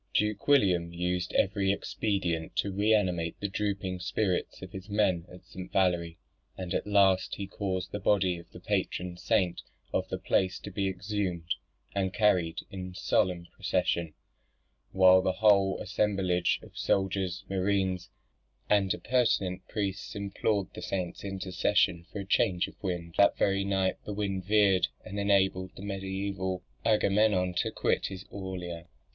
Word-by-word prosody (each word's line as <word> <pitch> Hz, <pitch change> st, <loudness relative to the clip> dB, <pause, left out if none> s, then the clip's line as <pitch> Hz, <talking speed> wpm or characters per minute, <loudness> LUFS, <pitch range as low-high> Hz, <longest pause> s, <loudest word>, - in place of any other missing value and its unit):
Duke 105 Hz, -1 st, 0 dB
William 95 Hz, -12 st, +4 dB
used 90 Hz, +1 st, -2 dB
every 95 Hz, 0 st, +2 dB
expedient 90 Hz, -5 st, -2 dB
to 100 Hz, +3 st, 0 dB
re 100 Hz, +3 st, +1 dB
animate 90 Hz, -6 st, +1 dB
the 100 Hz, -, -1 dB
drooping 100 Hz, -2 st, -2 dB
spirits 95 Hz, 0 st, -1 dB
of 95 Hz, -, -8 dB
his 95 Hz, +2 st, -8 dB
men 95 Hz, -4 st, +1 dB
at 90 Hz, -, -13 dB
St. 90 Hz, 0 st, -9 dB
Valery; 85 Hz, -3 st, +1 dB, 0.4 s
and 90 Hz, -2 st, -4 dB
at -, -, -1 dB
last 100 Hz, -2 st, +3 dB
he 100 Hz, -, -4 dB
caused 95 Hz, -2 st, -3 dB
the 105 Hz, -, -3 dB
body 95 Hz, -3 st, +2 dB
of 85 Hz, -, -15 dB
the -, -, -12 dB
patron 90 Hz, 0 st, -2 dB
saint 90 Hz, 0 st, +1 dB, 0.3 s
of -, -, 0 dB
the -, -, -2 dB
place 95 Hz, 0 st, +1 dB
to 100 Hz, -, -7 dB
be 100 Hz, +1 st, -1 dB
exhumed 95 Hz, -3 st, -2 dB, 0.4 s
and 95 Hz, 0 st, -1 dB
carried 90 Hz, -6 st, +2 dB
in 90 Hz, -1 st, -6 dB
solemn 90 Hz, -2 st, +1 dB
procession, 90 Hz, -4 st, 0 dB, 0.8 s
while 95 Hz, 0 st, +7 dB
the 95 Hz, 0 st, +1 dB
whole 100 Hz, -1 st, +4 dB
assemblage 95 Hz, -4 st, +1 dB
of -, -, -15 dB
soldiers, 95 Hz, -2 st, 0 dB
mariners, 95 Hz, -2 st, 0 dB, 0.6 s
and 100 Hz, -2 st, +4 dB
appurtenant 100 Hz, -7 st, 0 dB
priests 100 Hz, 0 st, -3 dB
implored 100 Hz, 0 st, -1 dB
the -, -, -8 dB
saint's 90 Hz, -3 st, -3 dB
intercession 90 Hz, -3 st, 0 dB
for 100 Hz, -, -4 dB
a -, -, -7 dB
change 95 Hz, -2 st, +2 dB
of -, -, -12 dB
wind. 85 Hz, -3 st, -3 dB
That 100 Hz, -, +5 dB
very 100 Hz, 0 st, +2 dB
night 95 Hz, -1 st, +1 dB
the 105 Hz, -, -5 dB
wind 100 Hz, -3 st, -2 dB
veered, 100 Hz, -3 st, +4 dB, 0.2 s
and 100 Hz, +2 st, -5 dB
enabled 95 Hz, -2 st, +2 dB
the 95 Hz, -, -9 dB
mediaeval 95 Hz, -1 st, -3 dB, 0.2 s
Agamemnon 105 Hz, -4 st, +3 dB
to -, -, +1 dB
quit -, -, 0 dB
his 95 Hz, -1 st, -8 dB
Aulia. 90 Hz, -3 st, -6 dB
95 Hz, 150 wpm, -29 LUFS, 90-100 Hz, 0.8 s, while